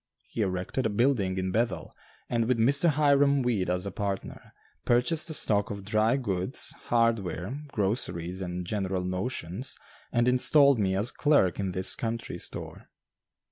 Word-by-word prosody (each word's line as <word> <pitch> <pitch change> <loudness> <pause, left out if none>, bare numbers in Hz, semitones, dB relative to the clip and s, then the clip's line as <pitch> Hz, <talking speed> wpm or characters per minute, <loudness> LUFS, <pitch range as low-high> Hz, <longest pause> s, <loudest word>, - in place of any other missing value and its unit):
He 115 - -6
erected 95 +5 -2
a - - -3
building 105 -4 0
in 95 0 -2
Bethel, 100 -6 -2 0.3
and 115 -2 -1
with 125 -1 +1
Mr. 140 +9 +3
Hiram 140 -2 +3
Weed 110 -7 -1
as 90 +1 -1
a 100 - -4
partner, 100 0 -5 0.3
purchased 125 +8 +2
a - - -2
stock 105 -6 +1
of 100 -1 -7
dry 110 +4 +1
goods, 100 -3 0
hardware, 115 - -1
groceries, 95 -6 -1
and 90 -1 -5
general 95 -1 -2
notions 95 +3 -2 0.3
and 120 +1 +1
installed 140 +1 +5
me 95 -2 0
as 105 +5 +1
clerk 145 - +2
in 95 -2 -2
this 95 +1 +3
country 115 -6 -4
store. - - -7
105 Hz, 150 wpm, -27 LUFS, 95-125 Hz, 0.3 s, installed